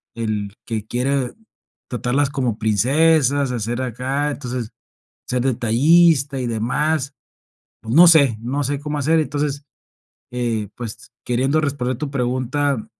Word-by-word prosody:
el 105 -3 -3
que 110 -2 -4
quiere 130 +1 -1 0.6
tratarlas 130 +3 0
como 125 -6 -1
princesas, 140 - +2
a 125 - -2
ser 120 +4 -3
acá, 130 +4 -2
entonces, 125 -5 -5 0.6
ser 125 -1 0
detallista 135 +4 +3
y 125 - -2
demás. 135 +6 -1 0.7
Pues, 115 +2 -4
no 175 +3 +9
sé 140 -9 +5
no 135 +5 -2
sé 140 +1 -2
cómo 150 0 -4
hacer. 160 +4 +2
Entonces, 145 0 -2 0.7
eh, 115 -4 -2
pues, 115 -1 -8
queriendo 130 +5 +1
responder 135 -4 -2
tu 150 -2 -4
pregunta, 130 0 -1
130 Hz, 130 wpm, -20 LUFS, 120-145 Hz, 0.7 s, no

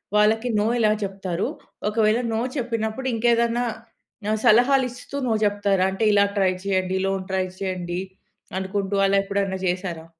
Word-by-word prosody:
వాళ్ళకి 220 +3 +3
నో 205 - +1
ఎలా 215 -2 +4
జెప్తారు? 190 -2 -3 0.4
ఒకవేళ 215 +1 +2
నో 220 - 0 0.2
చెప్పినప్పుడు 230 0 -2
ఇంకేదన్నా 235 +1 +2 0.7
ఆహ్, 220 - 0
సలహాలిస్తూ 250 +2 +3
నో 230 - +2
చెప్తారా? 200 -2 +2
అంటే 210 - -2
ఇలా 200 0 +5
ట్రై 190 -1 +3
చేయండి, 190 -1 0
లోన్ 195 -1 -2
ట్రై 190 -1 +1
చేయండి 180 -2 -3 0.6
అనుకుంటూ 195 +1 -2
అలా 195 0 +3
ఎప్పుడన్నా 195 -1 -1
జెశారా? 175 -2 -2
200 Hz, 135 wpm, -23 LUFS, 190-225 Hz, 0.7 s, ఇలా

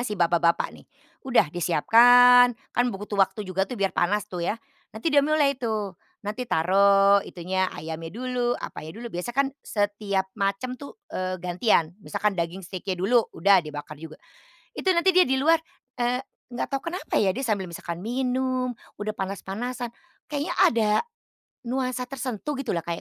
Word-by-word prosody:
si 245 -4 -3
bapak-bapak 170 -1 +2
nih. - - -15 0.4
Udah 230 -11 +3
disiapkan, 245 +8 +6 0.2
kan 245 - +2
butuh 205 -1 -7
waktu 205 +2 +1
juga 190 +1 -1
tuh 250 - -5
biar 195 -2 0
panas 205 +3 +1
tuh 180 -4 -6
ya, 220 - -1 0.4
nanti 295 +7 -1
dia 285 - +6
mulai 285 -2 +1
tuh 215 -5 -2 0.3
nanti 235 +4 -4
taruh 200 +3 +4
itunya 185 +1 -2
ayamnya 160 +2 -6
dulu, 245 -1 -1
apanya 160 +5 -8
dulu, 235 0 -8
biasanya 180 +9 -5
kan - - -2
setiap 205 -3 -1 0.2
macam 200 +6 -1
tuh, 280 0 -10 0.2
eee, 185 0 -2
gantian. 175 -2 +1
Misalkan 210 +1 -1
daging 175 +1 -3
steak-nya 185 +1 -4
dulu, 225 +6 +2
udah 195 +3 +5
dibakar 150 -1 -8
juga. 160 -1 -9 0.6
Itu 375 -1 +2
nanti 340 +2 +3
dia 365 - +7
di 265 - 0
luar, 325 +3 +5 0.4
eee, 245 +1 0 0.3
nggak 240 - -3
tahu 285 +5 -3
kenapa 370 - -2
ya 190 -3 +2
dia 265 - -4
sambil 210 -7 -1
misalkan 170 +2 -7
minum, 255 +1 -1 0.3
udah 215 0 -4
panas-panasan. 220 +6 -4 0.4
Kayaknya 290 -1 -2
ada, 220 -2 +4 0.8
nuansa 255 0 -2
tersentuh 265 +1 -4
gitulah 240 -12 -3
Kak 170 - -1
210 Hz, 160 wpm, -25 LUFS, 185-250 Hz, 0.8 s, dia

